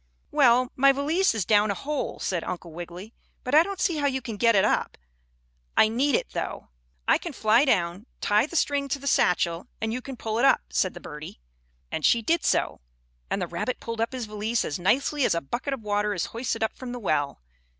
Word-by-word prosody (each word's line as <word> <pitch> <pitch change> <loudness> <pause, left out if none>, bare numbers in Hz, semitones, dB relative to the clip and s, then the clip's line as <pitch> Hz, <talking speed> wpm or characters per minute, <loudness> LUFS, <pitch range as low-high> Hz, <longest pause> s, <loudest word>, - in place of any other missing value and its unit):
"Well, 245 +1 +4
my 275 +1 +6
valise 295 +4 +1
is 210 -6 -1
down 210 0 +4
a 200 - 0
hole," 295 +4 -3
said 175 -3 -2
Uncle 175 -1 -6
Wiggily, 175 +6 -8 0.3
"but 255 - -4
I 305 - +8
don't 390 +2 -3
see 350 -3 +1
how 285 -1 +1
you 265 -1 0
can 235 -4 -6
get 230 +2 +3
it 190 - +4
up. - - 0 0.8
I 215 - +6
need 260 +4 +2
it, - - -2
though." - - -5 0.4
"I - - +4
can 335 - -6
fly 225 +3 +3
down, 180 - 0
tie 210 +6 +2
the 340 - -9
string 285 -3 +1
to 275 - -1
the 280 - -12
satchel 175 -7 +1
and 220 0 -2
you 250 - -3
can 265 0 -8
pull 220 0 -2
it 255 - +4
up," 270 - +5
said 185 - 0
the - - -7
birdie. 150 - -9 0.5
And 160 - -3
she 230 +7 +4
did 330 +6 +1
so, - - 0 0.5
and - - -1
the 180 - -1
rabbit 175 +9 -3
pulled 230 -1 -4
up 230 - -1
his 250 -3 -3
valise 215 +2 -1
as 145 - -3
nicely 275 +9 +1
as - - +3
a - - +1
bucket 240 - -4
of 235 - -15
water 205 0 0
is 180 - -1
hoisted 230 -1 -2
up 220 - 0
from 250 -2 -7
the 245 - -5
well. 145 -9 -1
230 Hz, 225 wpm, -26 LUFS, 195-270 Hz, 0.8 s, I